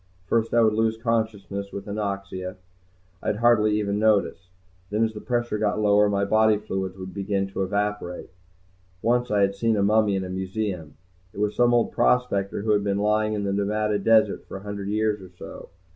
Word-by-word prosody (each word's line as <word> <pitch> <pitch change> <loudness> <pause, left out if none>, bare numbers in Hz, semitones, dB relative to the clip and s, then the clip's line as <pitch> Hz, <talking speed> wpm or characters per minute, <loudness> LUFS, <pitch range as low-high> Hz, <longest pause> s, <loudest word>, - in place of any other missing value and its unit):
First 115 +3 0
I 120 - +4
would 110 -1 +3
lose 110 0 +1
consciousness 110 -4 -2
with 100 - -7
anoxia. 100 -2 -4 0.7
I'd - - -1
hardly 110 -2 +3
even 100 -1 -1
notice. 100 -4 +1 0.4
Then 105 +2 +1
as 110 -1 0
the 105 - -8
pressure 120 -3 -1
got 105 0 0
lower 105 0 +4
my 100 0 +1
body 110 +1 +4
fluids 95 -3 -4
would 95 -1 -8
begin 100 0 -1
to 95 - -4
evaporate. 100 -2 -2 0.7
Once 120 +1 +1
I 105 -1 +2
had 100 0 +2
seen 110 +2 0
a 100 - +2
mummy 105 0 +3
in 95 - -1
a 90 - -6
museum, 95 -3 -4 0.4
it - - -9
was 105 0 0
some 120 0 +4
old 120 -1 +2
prospector 100 -6 +1
who 110 - +1
had 105 -1 +2
been 100 -1 0
lying 105 +1 +1
in 105 - -2
the 100 -1 -1
Nevada 105 +1 0
desert 110 0 +3
for - - -7
a 95 - -11
hundred 100 -1 -5
years 105 -1 0
or 95 - -11
so. 90 - -11
105 Hz, 195 wpm, -24 LUFS, 100-110 Hz, 0.7 s, I